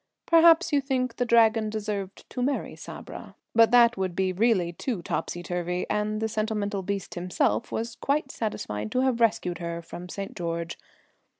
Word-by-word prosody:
Perhaps 335 0 +6
you 285 - +4
think 255 -3 -1
the 245 - +1
Dragon 225 -2 +4
deserved 205 -3 -4
to 250 - -3
marry 275 +3 -1
Sabra, - - -9 0.2
but 230 0 +6
that 240 -1 +5
would 185 -2 -2
be 190 0 0
really 190 -4 +2
too 205 -1 -3
topsy 175 +1 -3
turvy, 180 0 -2
and 210 0 0
the 220 - 0
sentimental 215 -2 -2
beast 195 0 -4
himself 180 +6 0
was 230 0 -3
quite 280 -1 0
satisfied 105 - -4
to 255 - +2
have 255 -3 +1
rescued 180 -6 +1
her 170 -1 -4
from 175 +1 -9
St. 195 +2 -6
George. 170 -1 -3
215 Hz, 170 wpm, -27 LUFS, 180-235 Hz, 0.2 s, Perhaps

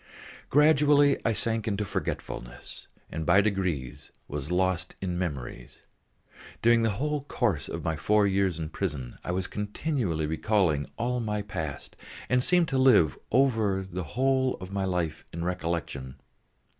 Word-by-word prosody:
Gradually 145 -1 +5
I 115 - +2
sank 115 +1 -1
into 105 0 -1
forgetfulness 60 -8 -5 0.2
and 80 - -3
by 95 - +5
degrees 95 - -1 0.2
was 75 0 -5
lost 95 0 0
in 90 -2 -2
memories. 70 -8 -5 0.8
During 120 0 +5
the 115 - +2
whole 150 +2 -1
course 100 - -1
of - - -5
my 80 - 0
four 105 +6 +3
years 95 -3 +1
in 80 -2 -4
prison 75 -11 -4
I - - -3
was 95 +1 -1
continually 105 - -2
recalling 80 -2 +1
all 125 +1 0
my 105 -3 -2
past, 80 -9 -5 0.3
and 125 0 +3
seemed 175 +1 +3
to 135 -3 +1
live 105 - +5 0.2
over 110 -6 +3
again 95 -1 -11
the 90 0 -2
whole 130 0 +2
of 95 +1 -9
my 100 -1 -1
life 85 -4 -2
in 85 +1 -4
recollection. 85 -7 -3
95 Hz, 150 wpm, -28 LUFS, 80-120 Hz, 0.8 s, Gradually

